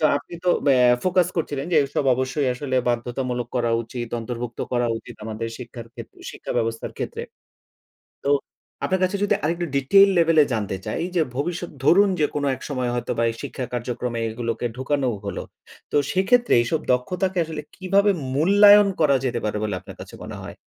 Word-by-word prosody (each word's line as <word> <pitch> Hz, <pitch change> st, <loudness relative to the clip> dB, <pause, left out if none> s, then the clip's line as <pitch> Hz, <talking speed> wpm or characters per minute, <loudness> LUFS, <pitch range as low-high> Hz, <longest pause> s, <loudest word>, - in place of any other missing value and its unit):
তো 155 Hz, -, +1 dB
আপনি 145 Hz, -, -8 dB
তো 180 Hz, -, +1 dB, 0.2 s
ব্যা 135 Hz, -2 st, +5 dB, 0.3 s
ফোকাস 180 Hz, -1 st, +2 dB
করছিলেন 145 Hz, -4 st, -2 dB
যে 160 Hz, -, +4 dB
এসব 140 Hz, 0 st, -2 dB
অবশ্যই 130 Hz, +2 st, -1 dB
আসলে 130 Hz, 0 st, -2 dB
বাধ্যতামূলক 120 Hz, 0 st, -2 dB
করা 120 Hz, -1 st, +1 dB
উচিত, 120 Hz, +1 st, -6 dB
অন্তর্ভুক্ত 120 Hz, 0 st, -6 dB
করা 120 Hz, -1 st, +2 dB
উচিত, -, -, -12 dB
আমাদের 110 Hz, +1 st, -4 dB
শিক্ষার 120 Hz, -2 st, -9 dB
ক্ষেত্রে -, -, -11 dB
শিক্ষা -, -, -6 dB
ব্যবস্থার 115 Hz, -1 st, -2 dB
ক্ষেত্রে। -, -, -4 dB, 1.0 s
তো 140 Hz, -, +1 dB, 0.6 s
আপনার 190 Hz, 0 st, 0 dB
কাছে 190 Hz, +2 st, +1 dB
যদি 205 Hz, -, +3 dB
আরেকটু 170 Hz, +3 st, 0 dB
ডিটেইল 195 Hz, +9 st, +6 dB
লেভেলে 165 Hz, -2 st, +5 dB
জানতে 105 Hz, -3 st, -2 dB
চাই -, -, -3 dB
যে 170 Hz, -, +4 dB
ভবিষ্যৎ 170 Hz, +4 st, -3 dB
ধরুন 195 Hz, +7 st, +5 dB
যে 150 Hz, -, +4 dB
কোনো 145 Hz, -1 st, 0 dB
এক -, -, -16 dB
সময় 130 Hz, -3 st, -1 dB
হয়তো 120 Hz, -, -2 dB
বা 115 Hz, -, +2 dB
এই 115 Hz, -, -4 dB
শিক্ষা 130 Hz, -, -4 dB
কার্যক্রমে 120 Hz, 0 st, -3 dB
এগুলোকে 115 Hz, +1 st, -3 dB
ঢুকানো 130 Hz, +1 st, 0 dB, 0.2 s
হলো। 100 Hz, -3 st, -4 dB, 0.5 s
তো -, -, -2 dB, 0.2 s
সেক্ষেত্রে 240 Hz, +6 st, +3 dB
এসব 150 Hz, +7 st, -1 dB
দক্ষতাকে 180 Hz, +9 st, -1 dB
আসলে 155 Hz, -2 st, -5 dB
কিভাবে 195 Hz, +2 st, +3 dB, 0.2 s
মূল্যায়ন 205 Hz, +5 st, +7 dB
করা 140 Hz, -3 st, +5 dB
যেতে 120 Hz, -2 st, -1 dB
পারে 105 Hz, 0 st, -1 dB
বলে 105 Hz, -3 st, -1 dB
আপনার -, -, -12 dB
কাছে -, -, -10 dB
মনে -, -, -7 dB
হয়? -, -, -9 dB
135 Hz, 175 wpm, -23 LUFS, 120-175 Hz, 1.0 s, মূল্যায়ন